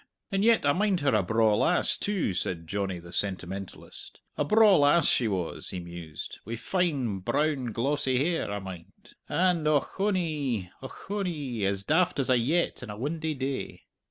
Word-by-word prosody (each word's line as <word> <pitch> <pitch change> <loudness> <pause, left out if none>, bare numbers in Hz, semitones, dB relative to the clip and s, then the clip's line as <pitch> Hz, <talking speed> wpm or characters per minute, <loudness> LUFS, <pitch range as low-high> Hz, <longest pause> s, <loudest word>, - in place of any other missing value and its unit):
And 195 0 +1
yet 230 -7 +4
I 145 - +4
mind 195 -1 +1
her 140 -3 +2
a 105 - +4
braw 110 +2 +3
lass, 180 - +2
too," 195 - -1
said 85 -1 -3
Johnny 95 +1 -2
the 85 0 -11
sentimentalist, 95 0 -4 0.2
"a - - 0
braw 215 +4 +6
lass 145 +2 +5
she 120 - +3
was," 95 -5 -3
he 90 - -3
mused, 85 -3 -8
"wi' 115 +3 -5
fine, 135 - -1
brown 145 +7 0
glossy 130 +2 0
hair, 165 +5 0
I 105 - -2
mind, 95 -4 -10 0.2
and 175 -4 +2
ochonee! 150 - 0
ochonee! 145 - -3
as 100 0 -1
daft 175 - +2
as 135 -2 +1
a 125 - +5
yett 160 +9 0
in 125 - -8
a 105 - -6
windy 155 +5 -2
day. 135 0 -4
135 Hz, 165 wpm, -28 LUFS, 100-165 Hz, 0.2 s, braw